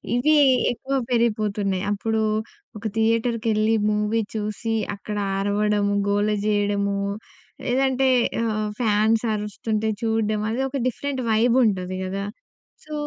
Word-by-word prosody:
ఇవి 300 +6 +3 0.4
ఎక్కువ 270 +3 -3 0.2
పెరిగిపోతున్నాయి. 210 -5 0
అప్పుడు 220 +2 0 0.6
ఒక 210 - -11
థియేటర్‌కెళ్ళి 225 -1 +1 0.2
మూవీ 210 +2 +1
చూసి 215 +1 -2 0.2
అక్కడ 210 +1 -6 0.2
అరవడము, 205 0 +1 0.2
గోల 205 +1 +2 0.2
చేయడము. 205 -1 +1 0.7
లేదంటే 265 +1 +2 0.4
ఆహ్, 215 -2 -1
ఫ్యాన్స్ 220 0 +2
అరుస్తుంటే 215 +1 -2
చూడ్డం 220 -2 0
అది 245 - -1
ఒక 275 - -3
డిఫరెంట్ 265 +2 -3
వైబ్ 230 +2 +3
ఉంటది 185 -3 -1
కదా! 195 +1 -3 0.6
సో, 305 - -9
215 Hz, 110 wpm, -23 LUFS, 205-230 Hz, 0.7 s, ఇవి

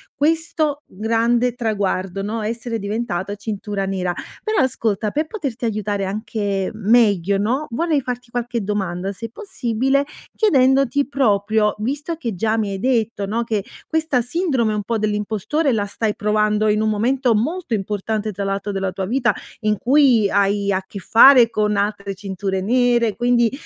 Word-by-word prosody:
questo 310 -1 0
grande 230 +3 +1
traguardo, 195 -5 -2
no, 220 +2 -3
essere 230 -1 -4
diventata 200 -2 -3
cintura 205 -1 -4
nera. 185 -2 -1 0.3
Però 435 -1 0
ascolta, 220 -4 -1
per 305 +5 -1
poterti 275 - -4
aiutare 205 -2 -1
anche 200 -1 -2
m 215 +1 0
meglio 200 -4 +3
no, 255 +9 -1
vorrei 315 +4 +1
farti 245 -2 -5
qualche 240 -2 -2
domanda 195 -2 -2
se 225 +3 -7
possibile 270 - -1 0.3
chiedendoti 275 - +3
proprio, 215 -5 +2
visto 290 +8 -3
che 240 -9 -4
già 220 +4 0
mi 210 -2 0
hai 195 - -4
detto, 225 -4 0
no, 225 +4 -1
che 215 -4 -2 0.2
questa 315 -5 0
sindrome 250 - 0
un 210 - -2
po' 225 +2 -1
dell'impostore 215 - 0
la 205 -2 0
stai 210 +1 -2
provando 210 0 +1
in 210 +1 +2
un 220 - +1
momento 240 +3 +1
molto 300 - -2
importante 210 +1 -2
tra 200 +1 -4
l'altro 195 +1 -2
della 195 -1 -2
tua 190 - -3
vita 240 +4 +1 0.3
in 215 -1 +1
cui 250 -5 +4
hai 200 0 +1
a 190 0 0
che 200 - -7
fare 235 +4 +7
con 210 -2 0
altre 200 -1 -2
cinture 190 0 -3
nere 235 0 +2
quindi, 240 -1 +3
220 Hz, 155 wpm, -20 LUFS, 200-250 Hz, 0.3 s, fare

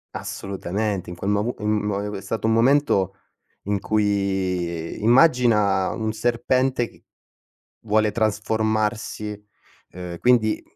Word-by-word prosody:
Assolutamente, 100 0 -3
in 90 - -6
quel 95 +4 -2
movu 105 +4 0
mhmm, 105 0 -1
mo 100 -1 -1
e - - -3
ue 105 - -5
è - - -11
stato 110 -1 -4
un 110 - +3
momento 115 -6 +3 0.5
in 100 0 0
cui 95 -5 -1
immagina 115 - +4
un 110 -1 -3
serpente 120 +2 +1
che - - -22 0.8
vuole 110 0 +2
trasformarsi, 110 -1 -1 0.5
uhm, 90 -1 -7
quindi 115 -3 +2
105 Hz, 125 wpm, -23 LUFS, 100-110 Hz, 0.8 s, immagina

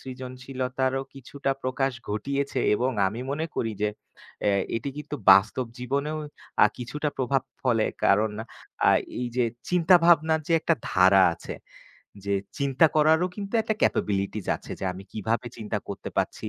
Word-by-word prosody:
সৃজনশীলতারও 130 0 -3
কিছুটা 135 +1 -4
প্রকাশ 130 +1 0 0.2
ঘটিয়েছে 140 +7 -2 0.2
এবং 125 +4 +1 0.2
আমি 115 +5 -6
মনে 160 +3 -2
করি 115 - 0
যে 105 - +3 0.6
এ - - +5 0.3
এটি 115 +4 -4
কিন্তু 150 0 -5 0.2
বাস্তব 110 +6 +3
জীবনেও 140 +5 -2 0.5
আ - - +8
কিছুটা 150 +5 -3
প্রভাব 130 0 +1 0.2
ফলে। 115 -4 +2 0.2
কারণ 105 +2 +4 0.6
আ - - +7 0.3
এই 125 - -1
যে 125 - +3 0.3
চিন্তাভাবনার 170 -2 +5
যে - - +1
একটা 165 - +2 0.2
ধারা 95 +1 +6
আছে। - - -8 0.7
যে 100 - +1 0.2
চিন্তা 140 +3 +4
করারও 160 +3 +4
কিন্তু 200 +1 -6
একটা 220 0 -1
ক্যাপাবিলিটিজ 100 0 0
আছে - - -10
যে - - -3
আমি 95 +2 -10
কীভাবে 110 +3 -2
চিন্তা 105 -1 -3
করতে 100 - -6
পারছি। 110 - -2
130 Hz, 145 wpm, -26 LUFS, 110-150 Hz, 0.7 s, আ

